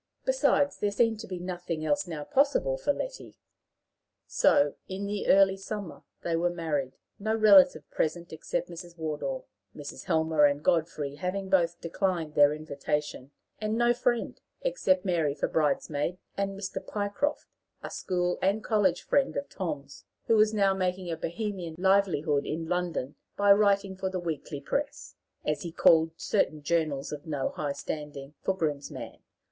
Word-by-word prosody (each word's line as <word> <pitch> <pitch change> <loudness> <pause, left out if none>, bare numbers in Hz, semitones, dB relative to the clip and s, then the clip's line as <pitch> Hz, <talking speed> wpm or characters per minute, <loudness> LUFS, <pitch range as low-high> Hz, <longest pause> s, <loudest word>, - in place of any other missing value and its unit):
Besides, - - +2
there 205 - +1
seemed 225 +1 +1
to 225 - -7
be 185 - -5
nothing 175 -3 -4
else 155 +5 +1
now 155 -4 -5
possible 290 - +2
for - - 0
Letty. - - -6 0.9
So, 145 0 +3
in 190 +2 -4
the 205 0 -3
early 195 0 +6
summer, 195 -2 -6 0.2
they 170 - 0
were 170 +2 +2
married, 150 -6 -2 0.3
no 220 +2 0
relative 195 -8 +6
present 170 +1 -2
except 160 - -3
Mrs. 175 0 -10
Wardour, 150 -4 -3 0.3
Mrs. 145 -2 -8
Helmer 160 -2 +3
and 145 +1 +1
Godfrey 155 -5 0
having 190 +4 -3
both 170 -2 +2
declined 170 -2 -1
their 145 -1 +6
invitation; 150 -2 -3 0.3
and 215 +1 -1
no 240 0 +4
friend, 240 0 -1 0.2
except 195 - +1
Mary 165 -6 +1
for 145 - -1
bridesmaid, 150 +2 0 0.2
and 195 0 -2
Mr. 190 -1 -4
Pycroft, 205 +9 -2 0.4
a - - -6
school 180 -1 -1
and 200 +3 +1
college 195 -5 +2
friend 280 -1 +1
of 280 - -4
Tom's, 145 -7 -5 0.2
who 225 - +4
was 215 0 +5
now 200 -3 +3
making 185 -1 -2
a - - -1
bohemian 175 0 -4
livelihood 175 -6 +2
in 160 +1 -3
London 175 -6 -2 0.2
by 205 0 +5
writing 200 -1 +2
for 190 0 -2
the 185 -1 -3
weekly 160 -3 -4
press, - - -3 0.3
as 150 0 0
he 170 - -5
called 165 -1 +5
certain 155 -7 0
journals 155 -3 0
of 150 +1 -7
no 145 -4 -1
high 145 -2 -3
standing, 145 -1 -6
for 190 - -1
groom's 150 -5 -2
man. - - -8
175 Hz, 160 wpm, -28 LUFS, 155-200 Hz, 0.9 s, early